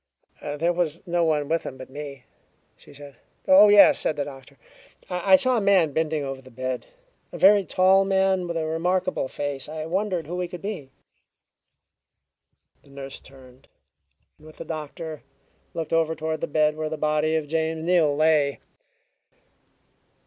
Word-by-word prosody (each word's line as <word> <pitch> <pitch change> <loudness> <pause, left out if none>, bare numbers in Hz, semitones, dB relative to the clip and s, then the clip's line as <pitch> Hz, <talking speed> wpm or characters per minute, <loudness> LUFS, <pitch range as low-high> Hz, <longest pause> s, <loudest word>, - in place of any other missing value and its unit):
"There 155 +4 -1
was 170 -1 -2
no 175 -1 0
one 150 -3 0
with 165 +1 0
him 130 - -8
but 130 0 -11
me," 140 -2 -8 0.5
she - - -18
said. 140 -2 -13 0.3
"Oh, 280 -7 +8
yes," 205 -1 +7
said 155 - -1
the 145 -1 -2
doctor. 135 0 -12 0.5
"I 180 +2 +4
saw 255 +5 +3
a - - 0
man 190 -7 +3
bending 160 -1 -1
over 135 -1 -6
the 130 - -16
bed 130 +1 -5 0.4
a - - -7
very 200 +1 +6
tall 190 +1 +3
man 190 -1 +1
with 170 -1 -3
a 160 - -2
remarkable 180 0 -1
face. 145 0 -5
I 155 0 -5
wondered 185 -1 -2
who 175 +4 -5
he 180 - -2
could 180 +1 -10
be." 195 -10 -5 1.9
The - - -23
nurse 135 0 -9
turned, 130 -1 -18 0.7
and 155 - -16
with 155 - -15
the - - -8
doctor 155 0 -7 0.5
looked 165 -1 -4
over 160 0 +1
toward 160 0 -4
the - - -2
bed 150 0 +1
where 155 0 -3
the 155 - -4
body 155 +1 0
of 160 -1 -1
James 160 +1 -2
Neal 165 -4 +2
lay. 150 -2 +2
160 Hz, 165 wpm, -24 LUFS, 145-180 Hz, 1.9 s, Oh